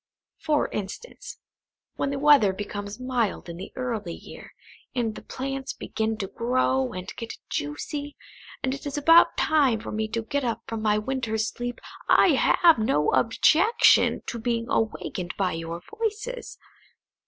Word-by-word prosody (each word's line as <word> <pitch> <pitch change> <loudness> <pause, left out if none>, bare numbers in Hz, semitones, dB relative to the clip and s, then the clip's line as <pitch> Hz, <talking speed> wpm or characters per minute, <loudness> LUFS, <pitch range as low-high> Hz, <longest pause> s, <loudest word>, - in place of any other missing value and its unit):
For 300 -1 +1
instance, - - -7 0.6
when 275 - -1
the 280 - -2
weather 275 -9 +5
becomes 205 +1 -6
mild 250 -7 -1
in 170 0 -7
the 190 - -8
early 225 -9 -3
year, - - -12 0.4
and 230 -3 0
the - - -9
plants 270 +1 -5
begin 220 0 -3
to 200 -3 -3
grow 255 +3 0
and 185 0 -7
get 230 - -6
juicy, 285 - -4 0.5
and 265 - 0
it 275 +1 -6
is 285 - -4
about 330 +4 +6
time 280 -8 +3
for - - -7
me 220 0 -1
to 225 +1 -3
get 280 +5 -2
up 235 -2 -2
from 225 -1 -4
my 210 -1 +2
winter's 220 -2 -1
sleep, 245 +1 -5 0.3
I - - +6
have 335 -7 +5
no 150 -9 +2
objection 350 - +4
to 235 - -4
be 230 0 -1
awakened 195 -6 -2
by 190 -2 +1
your 165 +1 -5
voices. 445 +3 -4
235 Hz, 155 wpm, -26 LUFS, 210-280 Hz, 0.6 s, about